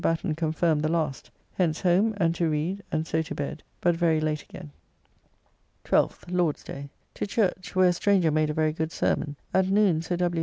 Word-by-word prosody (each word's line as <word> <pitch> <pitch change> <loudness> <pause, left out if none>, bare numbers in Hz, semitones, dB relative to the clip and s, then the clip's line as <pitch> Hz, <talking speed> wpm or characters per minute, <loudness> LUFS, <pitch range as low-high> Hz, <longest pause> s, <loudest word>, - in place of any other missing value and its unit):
Batten 165 0 0
confirm 160 0 +1
the 155 - 0
last. 155 -5 -2 0.2
Hence 165 -4 0
home 195 +5 +3
and 165 -4 +2
to 170 -1 0
read, 160 +6 -1
and 155 0 0
so 160 0 0
to 160 - -6
bed, 145 - -4 0.2
but 175 -1 +3
very 165 -2 +2
late 155 -1 -1
again. 75 - -11 1.1
12th - - +1
(Lord's 175 -4 0
day). 140 +1 -8 0.2
To - - -3
church, 185 -4 -1
where 185 -1 +5
a - - +2
stranger 180 -2 +2
made 155 0 +1
a - - -1
very 155 -1 +1
good 160 0 -3
sermon. 145 -3 -1 0.2
At 190 0 +3
noon 195 -5 +3
Sir 170 +2 -2
W. 175 -1 0
165 Hz, 195 wpm, -26 LUFS, 155-180 Hz, 1.1 s, where